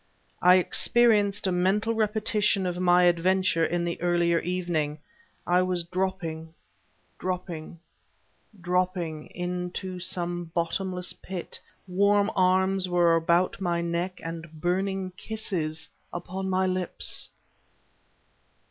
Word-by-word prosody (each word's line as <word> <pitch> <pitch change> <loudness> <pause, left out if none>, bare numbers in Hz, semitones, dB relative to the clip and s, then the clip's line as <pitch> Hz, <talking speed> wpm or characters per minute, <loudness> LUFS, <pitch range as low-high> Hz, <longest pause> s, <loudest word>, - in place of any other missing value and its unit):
I 180 +1 +7
experienced 205 +1 +3
a 190 - +2
mental 195 +5 +1
repetition 210 -2 +1
of 180 0 -2
my 180 0 +5
adventure 175 0 +3
in 170 +1 0
the 170 -1 -3
earlier 175 -1 +2
evening 170 -4 -1 0.5
I 180 +1 +3
was 180 -1 0
dropping, 170 -3 -3 0.6
dropping, 180 -3 -4 0.8
dropping 180 -3 -1
into 180 +1 -4
some 175 -1 -2
bottomless 180 +2 -1
pit... 185 -2 -5 0.3
warm 200 +3 +3
arms 185 0 +2
were 175 -1 +4
about 170 +4 +2
my 170 -2 0
neck; 170 +2 -2
and 165 -1 -6
burning 190 +2 -1
kisses 175 -9 -2 0.2
upon 190 +2 -4
my 190 0 +2
lips. 185 -1 0
180 Hz, 105 wpm, -27 LUFS, 170-190 Hz, 0.8 s, I